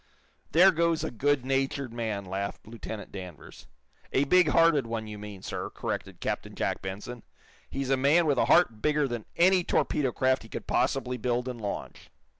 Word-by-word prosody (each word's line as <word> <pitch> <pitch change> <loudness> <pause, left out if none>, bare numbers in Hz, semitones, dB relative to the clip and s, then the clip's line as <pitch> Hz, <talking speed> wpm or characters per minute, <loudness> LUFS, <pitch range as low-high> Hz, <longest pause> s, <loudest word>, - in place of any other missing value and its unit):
"There 185 +4 +7
goes 170 -1 +1
a - - -3
good 135 +2 +1
natured 135 -1 -1
man," 110 -4 -3
laughed 95 +2 -4
Lieutenant 110 -1 -8
Danvers. 90 -5 -10 0.4
"A 135 - +3
big 180 +4 +4
hearted 150 -4 +4
one, 115 -1 -3
you 105 -1 -8
mean, 105 -2 -9
sir," - - -4
corrected - - -5
Captain - - -3
Jack - - -2
Benson. 105 +6 -6 0.5
"He's 135 -1 -3
a 135 - +4
man 145 +6 +4
with 140 -5 +2
a - - +3
heart 115 -12 +4
bigger 150 -1 +2
than 120 -4 -5
any 180 +1 +4
torpedo 140 -5 +1
craft 130 +2 +1
he 110 - -13
could - - -6
possibly 125 -2 0
build 125 +1 -1
and 125 -2 -5
launch." 100 -1 -6
130 Hz, 180 wpm, -28 LUFS, 110-145 Hz, 0.5 s, There